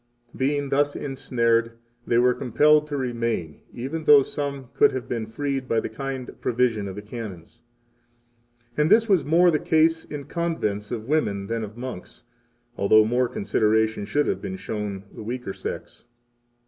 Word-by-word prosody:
6 - - -19
Being 140 +1 0
thus 145 +1 +1
ensnared, 115 -4 0 0.3
they 120 - +2
were 125 +1 +4
compelled 150 +6 +3
to 145 -1 -3
remain, 115 - -2
even 140 +6 -5
though 145 -2 +8
some 140 -3 -5
could - - +4
have 130 -3 -4
been 115 -2 -3
freed 135 +2 -3
by 115 - +2
the - - -4
kind 135 -2 -5
provision 115 -4 +1
of 95 - -6
the 105 - -7
Canons. 105 -7 -9 1.1
7 135 - -1
And 150 - +3
this 225 0 +5
was 190 -8 +3
more 170 +4 +4
the 155 - +1
case 160 +1 +2
in 145 -1 -7
convents 130 - -2
of 115 -2 -5
women 105 -10 0
than 115 +2 -3
of 105 +2 -8
monks, 125 -7 -8 0.5
although 110 +2 +5
more 120 +3 +1
consideration 110 0 +1
should 145 +7 +1
have - - -1
been 190 - -5
shown 105 - -5
the - - -9
weaker 120 -2 -5
sex. - - -7
125 Hz, 170 wpm, -24 LUFS, 110-145 Hz, 1.1 s, though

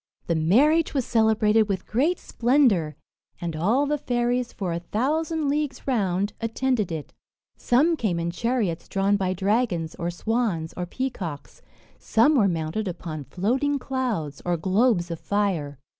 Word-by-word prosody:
The 170 - 0
marriage 270 - +3
was 265 -4 +1
celebrated 220 -1 +3
with 190 -2 -2
great 295 +11 +1
splendour; 235 - +2 0.4
and 170 -2 -4
all 220 - +2
the 295 +1 -1
fairies, 245 -1 0
for 185 -4 -3
a 170 - -2
thousand 300 - -1
leagues 290 -1 -2
round, 200 -5 0
attended 230 -3 0
it. 155 -3 -6 0.4
Some 295 +8 +2
came 200 - -1
in 170 0 -2
chariots 215 -4 -1
drawn 195 +1 +2
by 190 -2 0
dragons, 190 -4 0
or 170 - -3
swans, 185 -3 -1
or 180 -1 -4
peacocks; 175 - -5 0.4
some 235 +8 +3
were 225 -9 +4
mounted 170 +4 -2
upon 160 -4 -5
floating 260 - 0
clouds, 240 - -3
or 175 -1 0
globes 190 0 +2
of 165 - -4
fire. 185 -9 -1
210 Hz, 145 wpm, -25 LUFS, 175-255 Hz, 0.4 s, were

